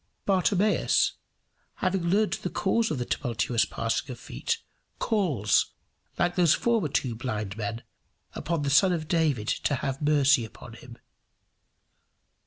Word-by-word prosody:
Bartimaeus, 195 +2 +2 0.6
having 185 0 0
learned 200 +5 +2
the 180 - -3
cause 220 +5 +1
of 155 - -2
the 125 - -2
tumultuous 120 -3 0
passing 115 +4 -2
of 125 -2 -7
feet, 465 - -3 0.4
calls, 160 - +1 0.4
like 175 0 +1
those 175 -4 +4
former 230 -8 +1
two 130 -3 -1
blind 110 -4 -4
men, 115 +1 -4 0.5
upon 165 -3 -2
the 140 - 0
Son 180 +6 +5
of 155 -3 -3
David 155 -10 +1
to 145 - 0
have 135 +2 -3
mercy 145 -5 +3
on 120 - -11
him. 120 +1 -12
145 Hz, 135 wpm, -27 LUFS, 120-185 Hz, 0.6 s, Son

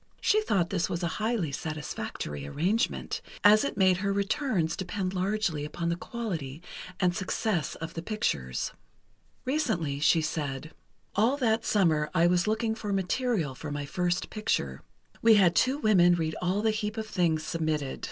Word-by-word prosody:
She 430 0 +3
thought 185 - +1
this 185 -3 0
a 170 0 -1
highly 210 -3 -1
satisfactory 140 - -5
arrangement, 185 - -1 0.2
as 210 +1 +7
it 280 - -3
made 185 -2 +4
her 200 +1 -1
returns 200 - 0
depend 190 0 -3
largely 190 -4 0
upon 170 +3 -3
the 170 - +1
quality 170 - -5 0.4
and 180 -2 +2
success 190 -4 -1
of 165 - -6
the 165 - -4
pictures. 70 - -2 0.7
Recently, 215 - 0
she 160 +2 +4
said: 155 -2 -3 0.4
"All 230 +7 +3
that 225 -4 +1
summer 160 -7 +2
I 170 -1 +5
was 175 +2 +3
looking 220 +1 +1
for 215 -2 -4
material 195 - 0
for 150 +4 -7
my 145 0 -3
first 180 +4 -1
picture. 70 - -1 0.4
We 225 -1 +7
had 185 -4 +5
two 260 +3 +3
women 185 -9 +5
read 160 -2 -2
all 185 +4 0
the 220 - +3
heap 215 0 -3
of 220 - -2
things 170 -7 +1
submitted. 155 -4 -2
180 Hz, 160 wpm, -28 LUFS, 160-215 Hz, 0.7 s, as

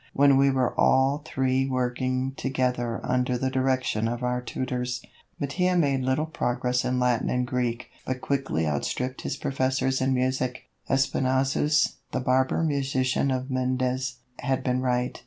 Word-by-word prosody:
When 140 0 +5
we 140 0 +5
were 130 -2 +1
all 135 +3 +4
three 135 -2 0
working 130 +1 -1
together 125 -3 -1
under 125 0 +1
the 130 +1 -1
direction 130 -4 +1
of 120 +1 -3
our 125 0 0
tutors, 125 0 -3 0.4
Mattia 180 +6 +1
made 140 -5 +2
little 130 +4 +1
progress 125 -5 -1
in 125 0 0
Latin 125 -2 +1
and 125 0 0
Greek, 125 -2 -2
but 130 0 -3
quickly 135 - -1
outstripped 125 - -2
his - - -3
professors 130 -1 0
in 130 0 +2
music. 130 0 -1 0.3
Espinassous, 135 +2 +2 0.2
the - - 0
barber 130 +4 +2
musician 135 -3 +1
of 130 0 -2
Mendes, 130 0 -1 0.2
had 130 -1 -1
been 125 -1 0
right. 125 -1 -1
130 Hz, 145 wpm, -26 LUFS, 125-135 Hz, 0.4 s, When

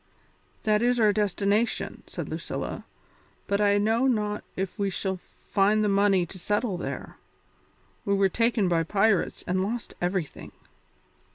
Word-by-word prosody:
"That 210 0 +3
is 245 0 +2
our 215 -2 +5
destination," 205 +2 0
said - - -6
Lucilla, - - -5 0.6
"but 200 +1 0
I 205 0 +4
know 225 +5 +2
not 210 -4 0
if 190 +3 -4
we 200 -1 +1
shall 190 0 -2 0.3
find 210 +2 +3
the 210 - +2
money 195 -2 +3
to 185 +2 -10
settle 205 +2 0
there; 175 - -6 0.9
we 200 - +1
were 195 0 +4
taken 230 0 +1
by 170 -2 +2
pirates 195 +3 +1
and 185 +1 0
lost 220 +4 -3
everything." 175 -3 -3
205 Hz, 145 wpm, -27 LUFS, 195-215 Hz, 0.9 s, our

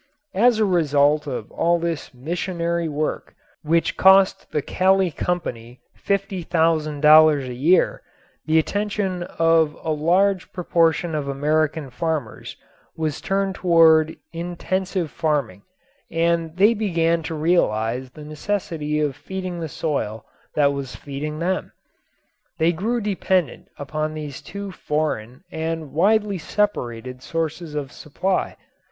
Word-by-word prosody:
As 235 +4 +4
a 220 - +3
result 150 -4 +2
of 125 -5 -5
all 170 +1 +2
this 170 -3 -3
missionary 170 +4 -2
work, 150 +1 -3 0.3
which 165 +2 +1
cost 190 0 +5
the 150 - -1
Kali 190 -1 +2
Company 125 -9 -4 0.2
$50,000 155 -6 +3
a 125 - -5
year, 155 +9 +2 0.5
the 160 +1 +3
attention 200 +1 -1
of 165 -3 +2
a 160 - -1
large 180 +5 +1
proportion 170 -2 +1
of 150 -2 -2
American 150 +1 0
farmers 150 -5 -4 0.4
was 155 -3 -2
turned 195 0 0
toward 160 -3 +4 0.2
intensive 175 +1 -3
farming 145 - -1 0.5
and 165 0 0
they 205 +4 +5
began 170 -6 +1
to 160 0 -5
realize 130 -7 +1
the 150 +4 -12
necessity 155 -2 -2
of 145 -3 0
feeding 185 0 -6
the 160 -2 -4
soil 115 -9 -3 0.3
that 140 -1 +3
was 140 -2 -5
feeding 150 +2 -5
them. 180 +3 -2 0.8
They 165 +1 +3
grew 225 +8 -1
dependent 190 -4 -1
upon 155 +2 -3
these 150 -3 -6
two 200 -1 -7
foreign 150 -7 -3
and 160 -3 -4
widely 205 +3 +2
separated 125 - -2
sources 160 +1 -4
of 140 -2 -4
supply. 185 +5 -2
160 Hz, 120 wpm, -22 LUFS, 150-180 Hz, 0.8 s, cost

